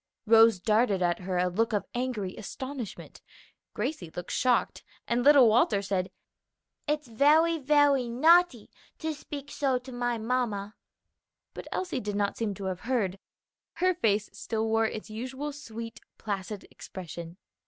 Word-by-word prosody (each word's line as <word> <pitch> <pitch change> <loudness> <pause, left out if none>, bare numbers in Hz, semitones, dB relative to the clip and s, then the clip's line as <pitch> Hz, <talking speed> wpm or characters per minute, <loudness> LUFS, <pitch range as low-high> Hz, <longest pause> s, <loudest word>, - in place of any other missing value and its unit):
Rose 225 -2 +6
darted 210 -1 +2
at 175 -1 +1
her 185 0 -3
a 180 - +2
look 220 +6 0
of 205 - 0
angry 240 -7 -3
astonishment, 260 +1 -7 0.5
Gracie 215 - -3
looked 175 0 -6
shocked, 250 -2 +1 0.2
and 240 +1 +1
little 280 -3 +7
Walter 215 -2 +3
said, 190 -1 -1 0.8
"It's 300 -1 -1
very, 310 +8 +4
very 285 -3 +3
naughty 315 0 +4 0.3
to 320 -1 -3
speak 285 -1 -8
so 270 -3 +1
to 250 +1 -10
my 245 -1 -1
mamma." 220 -3 -2 0.8
But - - -8
Elsie 360 -8 -2
did 205 -3 -4
not 200 -1 0
seem 215 -3 -2
to 195 - -8
have 185 -1 -3
heard; 205 -6 -1 0.5
her 370 +1 +2
face 215 - +1
still 220 -1 -3
wore 225 0 +2
its 215 0 -7
usual 260 +6 -5
sweet, 230 -5 -8 0.2
placid 200 -1 -5
expression. 170 -1 -9
230 Hz, 145 wpm, -28 LUFS, 200-270 Hz, 0.8 s, little